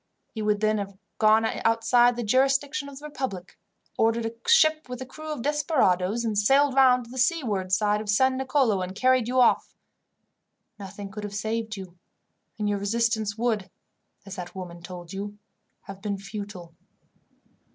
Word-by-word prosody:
He 220 - -5
would 210 -1 0
then 215 0 +2
have 200 -1 -6 0.2
gone 220 +1 +5
outside 230 +2 +3
the 240 - -3
jurisdiction 275 +5 +1
of 275 - -11
the 295 - -10
republic, 260 -11 -6 0.4
obtained 225 +1 +2
a 225 - -2 0.2
ship 310 - +4
with 250 -1 -6
a 260 - -5
crew 310 +4 -8
of 280 -6 -4
desperadoes, 235 - +1 0.2
sailed 275 +4 +4
round 255 -2 +5
to 230 - -14
the 260 - -6
seaward 235 - 0
side 210 +2 +2
of 215 - -8
San 260 +5 +3
Nicolo, 260 -6 +1
and 185 +1 -5
carried 255 +1 +3
you 255 +1 +1
off. 245 - +3 1.0
Nothing 200 0 -8
could 210 +2 -7
have 205 -1 -6
saved 220 0 -3
you, 180 -2 -10 0.6
and 210 -1 -1
your 205 -1 0
resistance 220 0 0
would, 225 -4 -1 0.6
as 195 0 -8
that 175 0 -7
woman 175 -2 -8
told 175 0 -9
you, 205 +1 -6 0.4
have 195 -2 -11
been 205 -1 -2
futile." 200 -4 -8
220 Hz, 165 wpm, -26 LUFS, 200-255 Hz, 1.0 s, gone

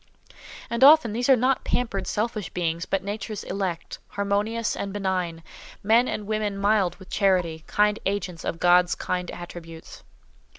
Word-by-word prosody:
And 235 +2 0
often, 290 -6 +7
these 245 +4 -1
are 265 - +8
not 255 +2 +1
pampered, 200 -6 -2
selfish 215 -3 -2
beings, 170 -1 -2
but 195 -1 -1
Nature's 205 +1 -5
elect, 185 -4 -4
harmonious 205 +3 -1
and 200 - -4
benign; 185 -4 -2 0.4
men 230 +4 +4
and 210 - -3
women 210 -1 -2
mild 200 -3 +2
with 190 -2 -15
charity, 180 -5 +1
kind 210 +1 +2
agents 190 -4 -3
of 165 - -3
God's 175 0 +4
kind 180 -1 -3
attributes. 165 -2 -10
200 Hz, 145 wpm, -25 LUFS, 180-215 Hz, 0.4 s, are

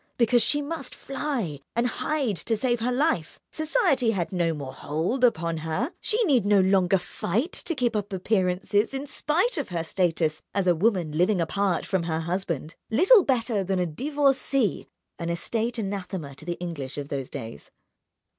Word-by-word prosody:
Because 240 0 +4
she 290 +6 +1
must 285 -3 -5
fly 255 - -3 0.2
and 235 +1 +2
hide 260 -2 -1
to 225 +9 -1
save 240 +2 0
her 240 +3 0
life, 250 - 0
society 310 - +2
had 190 -6 -1
no 175 -3 +1
more 140 -4 -6
hold 165 - -2
upon 170 -8 +2
her, 160 - -2
she 460 +2 +1
need 275 - +3
no 205 0 +4
longer 190 0 +4
fight 210 - -2
to 335 - -2
keep 245 -4 0
up 205 -1 -2
appearances 195 +3 +1
in 270 +1 -3
spite 335 - 0
of 280 - -4
her 170 -2 -2
status 165 -3 0
as 200 -2 +1
a 180 - +5
woman 180 -3 +1
living 180 +5 +2
apart 185 +2 0
from 190 -2 0
her 165 -1 -2
husband, 170 -3 -3 0.2
little 370 - +6
better 230 -7 +1
than 190 0 -1
a 180 - +1
divorcée—an 270 - -1
estate 225 +8 -1
anathema 190 -7 -4
to 140 - -12
the 175 0 -3
English 150 -7 -5
of 145 -1 -5
those 135 -2 -3
days. 110 -11 -8
200 Hz, 170 wpm, -26 LUFS, 170-255 Hz, 0.2 s, little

